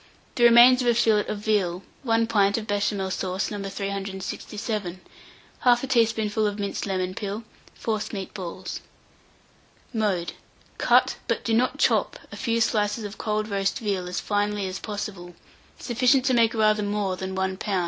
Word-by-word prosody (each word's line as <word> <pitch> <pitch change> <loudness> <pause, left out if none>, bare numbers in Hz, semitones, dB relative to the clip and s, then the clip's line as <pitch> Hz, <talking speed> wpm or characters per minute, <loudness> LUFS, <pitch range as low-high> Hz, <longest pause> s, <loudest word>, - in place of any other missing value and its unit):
The 240 - +3
remains 240 +2 +8
of 245 - -1
a 240 - +4
fillet 220 -3 +3
of 210 - -3
veal, 195 -4 0 0.2
1 230 -3 +2
pint 205 -3 +2
of 220 - -4
Béchamel 205 -2 -1
sauce 185 +2 -2
No. 205 -1 -4
367, 195 0 -4 0.6
1/2 245 +1 +3
teaspoonful 220 -3 +2
of 205 0 -3
minced 200 0 -3
lemon 185 -1 -1
peel, 205 +2 -4 0.4
forcemeat 210 -3 -3
balls. 185 -1 -6 1.1
Mode. 200 -6 0 0.5
Cut - - +4
but - - -1
do 225 - +1
not 245 +3 +2
chop - - +2
a - - -7
few 230 -2 0
slices 215 0 +1
of 205 +1 -7
cold 215 0 -1
roast 195 -2 -1
veal 200 -7 -2
as 180 - -2
finely 205 -1 -1
as 185 +1 -4
possible, 195 -4 -6 0.4
sufficient 250 +2 +2
to 260 - +3
make 230 -1 +3
rather 215 -1 +3
more 205 -2 -1
than 190 +1 -5
1 190 0 -1
lb. 195 -2 -1
210 Hz, 160 wpm, -25 LUFS, 195-225 Hz, 1.1 s, remains